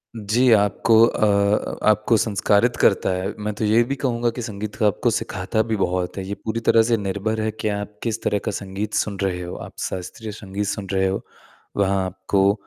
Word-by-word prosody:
जी, 115 +3 +2
आपको 105 +2 +3
अ 110 - +1
अ, 100 0 +1
आपको 110 +2 +3
संस्कारित 105 +3 +2
करता 100 - +3
है, 95 +1 -2
मैं 105 0 -3
तो 110 - -1
ये 110 +3 +4
भी 135 +4 -3
कहूँगा 120 -3 0
कि 125 - -4
संगीत 105 -2 -5
का 110 - +2
आपको 110 +4 +1
सिखाता 95 +2 -1
भी 110 0 -2
बहुत 90 -2 -1
है, 95 - -3
ये 100 - -3
पूरी 110 +1 -1
तरह 115 - +6
से 115 0 +2
निर्भर 100 +2 -2
है 110 - 0
कि 110 0 -4
आप 105 0 -4
किस 115 -1 -2
तरह 105 - +1
का 110 - 0
संगीत 100 +1 -5
सुन 100 -2 -1
रहे 90 -2 -1
हो, 90 0 -6
आप - - -9 0.2
शास्त्रीय 95 +4 -6
संगीत 100 -1 -5
सुन 100 0 -3
रहे 95 0 +2
हो। 95 +1 -2 0.6
वहाँ 95 -1 +2
आपको 95 +2 +1
105 Hz, 210 wpm, -22 LUFS, 95-110 Hz, 0.6 s, तरह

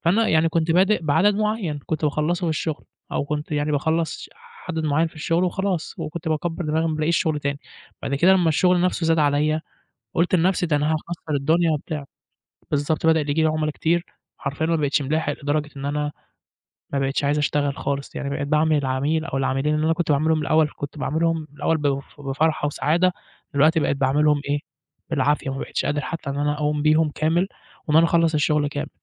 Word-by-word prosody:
فأنا 210 +7 +3
يعني 160 +1 +3
كنت 165 0 0
بادئ 190 +2 +3
بعدد 160 +7 +3
معين 210 -8 -1
كنت 160 -1 -2
باخلصه 155 +4 0
في - - +1
الشغل 155 -1 -3 0.3
أو - - 0
كنت 150 +1 -4
يعني 150 0 0
باخلص 160 +3 -1 0.4
عدد 160 -2 -2
معين 155 +3 +2
في 160 - -22
الشغل 165 +3 +1
وخلاص 185 -1 -2
وكنت 165 +1 -5
باكبر 165 +2 -2
دماغي، 155 +1 0
لما 165 - +1
ما 160 - -1
بالاقيش 155 +2 +1
شغل 155 -3 0
تاني 140 0 -2 0.4
بعد 140 - -2
كده 175 +7 +5
لما 180 -3 +3
الشغل 180 +3 +3
نفسه 180 -2 0
زاد 165 0 +3
عليّا 150 +2 +2 0.5
قُلت 175 +2 +2
لنفسي 180 +1 +2
ده 155 -3 +1
أنا 150 +2 +1
هاكسر 160 0 -4
الدنيا 160 +4 +2
وبتاع، 150 -1 -4 0.7
بالضبط، 150 +2 0
بدأ 160 0 +5
ييجي 150 +2 0
لي 160 - +4
عملا 155 0 0
كتير 170 +3 0 0.3
حرفيًا 140 +3 -2
ما 165 0 +2
بقيتش 145 -1 +1
ملاحق 145 +1 0
لدرجة 150 +1 0
إن 135 - -6
أنا 150 +1 -1 0.8
ما 140 - 0
بقيتش 135 +1 0
عايز 145 +1 +2
أشتغل 145 -1 0
خالص 140 0 -3
يعني 140 - -3
بقيت 140 0 -3
باعامل 155 +1 +3
العميل 145 +3 0
أو 135 - -2
العميلين 135 +3 0
اللي 150 - 0
أنا 165 - +3
كنت 175 0 -2
باعاملهم 155 +2 +2
الأول 155 +1 +3
كنت 145 +1 -6
باعاملهم 160 +3 0
الأول 165 - +1
ب 140 -2 0 0.2
بفرحة 145 +2 0
وسعادة 170 +5 +1 0.4
دلوقتي 155 +3 +4
بقيت 140 - +1
باعاملهم 145 +2 +2
إيه 145 - +2 0.5
بالعافية، 145 -1 +1
وما 135 - -4
بقيش - - -3
قادر 145 0 0
حتى 165 -4 -5
إن 140 - -3
أنا 145 0 +1
أقوم 150 0 -1
بيهم 155 0 +3
كامل 165 +6 +1 0.4
وإن 150 - +2
أنا 165 +1 +6
أخلص 165 -1 +2
الشغل 150 -1 +2
كامل 145 0 -4
155 Hz, 195 wpm, -23 LUFS, 145-165 Hz, 0.8 s, أنا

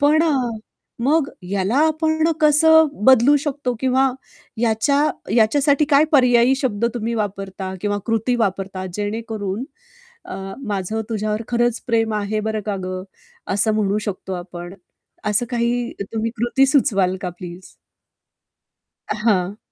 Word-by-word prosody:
पण 300 +2 +4
अ, 320 -3 +2 0.7
मग 290 +2 +2
ह्याला 195 +5 -1
आपण 315 +1 +1
कसं 320 +1 +6 0.2
बदलू 265 +2 +6
शकतो? 280 -4 -2
किंवा 265 0 +2 0.5
याच्या 235 +5 +2 0.4
याच्यासाठी 280 +6 +3
काय 285 +2 +6
पर्यायी 250 -1 +5
शब्द 235 -6 -1
तुम्ही 235 0 -2
वापरता 195 -3 -4
किंवा 205 0 -1
कृती 225 +2 0
वापरता, 195 -3 -2
जेणेकरून 210 0 -3 0.6
अ, - - -7 0.3
"माझं 205 +1 -2
तुझ्यावर 215 0 -2
खरंच 240 -1 +1
प्रेम 225 -2 +1
आहे, 210 +1 -1
बरं 220 0 -2
का 205 -2 -1
गं!" 185 0 -4 0.5
असं 215 +2 +3
म्हणू 210 -1 +1
शकतो 190 -1 -5
आपण? 175 0 -8 0.5
असं 210 +3 +2
काही 240 0 -1 0.2
तुम्ही 225 0 -1
कृती 240 +4 +2
सुचवाल 195 -9 +2
का, 180 - -2
प्लीज? 180 +1 -10 1.4
हां. 205 -3 0
225 Hz, 125 wpm, -20 LUFS, 200-265 Hz, 1.4 s, कसं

